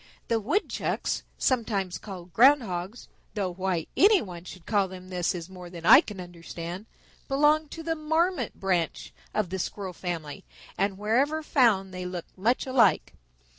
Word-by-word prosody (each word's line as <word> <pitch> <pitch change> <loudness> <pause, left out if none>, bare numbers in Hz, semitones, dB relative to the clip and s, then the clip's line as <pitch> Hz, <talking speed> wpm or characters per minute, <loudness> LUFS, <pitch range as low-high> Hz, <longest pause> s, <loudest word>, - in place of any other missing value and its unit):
The 230 - +2
Woodchucks, 295 - -1 0.2
sometimes 210 -8 0
called 185 -4 -9
Ground 270 +3 +6
Hogs, 185 +3 -5 0.3
though 190 -4 -1
why 185 -3 -1
any 405 +1 +6
one 180 - -8
should 185 -2 -11
call 205 -3 +2
them 185 0 -10
this 180 -1 -1
is 170 -1 -6
more 180 -2 -10
than 170 -2 -9
I 270 - +9
can 210 - -9
understand, 175 +2 -7 0.4
belong 295 +2 +3
to 325 - -8
the 325 0 0
Marmot 320 - 0
branch 180 -4 -1 0.2
of 200 -5 -1
the 190 - -2
Squirrel 190 0 -4
family, 170 0 -5 0.3
and 195 0 0
wherever 265 +10 +1
found 210 -10 +3
they 180 0 -5
look 180 -2 -5
much 225 +7 +1
alike. 250 -6 +3
195 Hz, 160 wpm, -27 LUFS, 180-255 Hz, 0.4 s, I